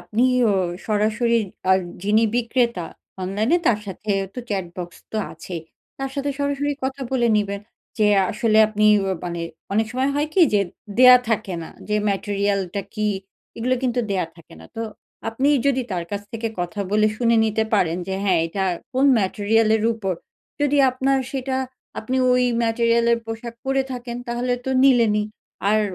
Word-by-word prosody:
আপনি 230 +4 0 0.3
অ - - +3 0.3
সরাসরি 220 +2 +2 0.3
আ - - +8 0.3
যিনি 215 +3 +3
বিক্রেতা 235 -6 0 0.4
অনলাইনে 215 - +1
তার 215 -3 +4
সাথে 200 +3 -5 0.2
তো - - -6
চ্যাট 190 -4 -2
বক্স 175 -1 -6 0.2
তো - - -2 0.2
আছেই। 175 -3 -7 0.4
তার 270 0 -3
সাথে 280 0 -1
সরাসরি 285 0 0
কথা 265 +1 -3
বলে 240 -2 +2
নিবেন। 200 -1 -1 0.4
যে 210 - +4 0.2
আসলে 220 0 +2
আপনি 215 0 +2 0.2
অ - - 0
মানে 170 -1 -4 0.3
অনেক 220 +2 +2
সময় 260 +2 +1
হয় 295 +1 0
কি 380 - +4
যে 200 - +5 0.4
দেয়া 250 0 +10
থাকে 215 -5 -1
না। - - -8 0.2
যে 210 - +1
ম্যাটেরিয়াল 200 0 0
টা 200 - -1
কি 215 -1 -1 0.5
এগুলো 250 +3 +1
কিন্তু 245 -1 +1
দেয়া 185 -4 0
থাকে 165 - -16
না। - - -12
তো 225 - -2 0.5
আপনি 260 +6 0 0.2
যদি 260 -2 +2
তার 175 -2 -2
কাছ 205 0 -3
থেকে 225 0 -2
কথা 175 +3 -3
বলে 215 +1 +4
শুনে 235 -1 +3
নিতে 220 0 +1
পারেন 170 -4 +2
যে 190 - -1
হ্যাঁ, 185 -4 +3
এটা 190 +3 -2 0.3
কোন 260 +2 +2
ম্যাটেরিয়াল 215 +3 +2
এর 220 - -2
উপর। 195 -5 -2 0.5
যদি 290 0 +2
আপনার 270 +1 +1
সেটা 265 -1 -2 0.4
আপনি 255 +4 -2 0.2
ওই 250 0 +3 0.2
ম্যাটেরিয়ালের 235 0 +2
পোশাক 230 +1 -6
পরে 270 0 +1
থাকেন 240 -1 -5
তাহলে 245 +1 -1
তো 265 - -2
নিলেনই। 230 -5 +4 0.5
আর 215 0 +4
225 Hz, 170 wpm, -22 LUFS, 205-250 Hz, 0.5 s, দেয়া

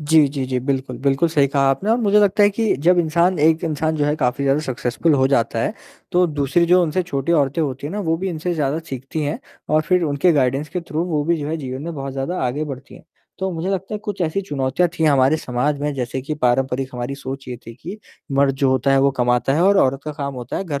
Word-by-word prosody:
जी, 155 0 +4
जी, 135 -1 -3
जी। 130 -1 -1
बिल्कुल, 130 -2 -3
बिल्कुल 140 +4 +1
सही 145 -3 +3
कहा 140 0 0
आपने 190 +11 -1
और 230 - +4
मुझे 210 -2 +4
लगता 205 +1 +3
है 205 - +6
कि 220 +2 0
जब 180 0 +5
इंसान 170 +2 +2
एक 160 +3 +3
इंसान 155 0 -1
जो 145 - +1
है, 150 +1 +1
काफ़ी 135 0 0
ज़्यादा 140 +2 +2
सक्सेसफुल 130 +3 0
हो 130 -1 +3
जाता 120 -4 +1
है, - - -1 0.4
तो 180 0 +4
दूसरी 150 +2 +1
जो 180 +1 +5
उनसे 175 +2 0
छोटी 145 -2 -2
औरतें 145 -1 +1
होती 140 -1 -3
हैं 155 - -6
ना, 210 - -3
वो 165 -4 0
भी 190 +2 -3
इनसे 175 +1 -3
ज़्यादा 150 -1 0
सीखती 135 +4 -5
हैं 145 +1 -2 0.3
और 155 +1 +3
फिर 180 -1 +3
उनके 150 +3 +2
गाइडेंस 135 +1 +1
के 180 +5 -3
थ्रू 165 0 -3
वो 155 -4 -1
भी 170 +1 +1
जो 150 -1 -4
है 160 - -2
जीवन 130 -2 -6
में 170 +1 -5
बहुत 135 -2 -5
ज़्यादा 135 +7 -3
आगे 140 +5 -2
बढ़ती 140 -2 -8
हैं। - - -15 0.3
तो 190 0 -2
मुझे 170 +3 -3
लगता 195 +2 -3
है 210 - -3
कुछ 205 -3 -5
ऐसी 165 +4 0
चुनौतियाँ 145 +1 0
थी 160 - +2
हमारे 140 0 +4
समाज 140 +1 -1
में, 150 0 -1
जैसे 130 0 -3
कि 150 +3 -3
पारंपरिक 130 0 0
हमारी 125 +2 -4
सोच 135 -1 -7
ये 125 - -5
थी 115 - -9
कि, 180 - -9 0.3
मर्द 135 0 +3
जो 135 -1 +1
होता 130 +1 +1
है 135 - +4
वो 140 +1 +4
कमाता 125 +2 +2
है 165 - +2
और 200 +1 +4
औरत 135 +1 -1
का 150 - -4
काम 140 -2 -5
होता 125 -1 -5
है - - -3
घर 145 -6 -3
145 Hz, 260 wpm, -20 LUFS, 135-170 Hz, 0.4 s, है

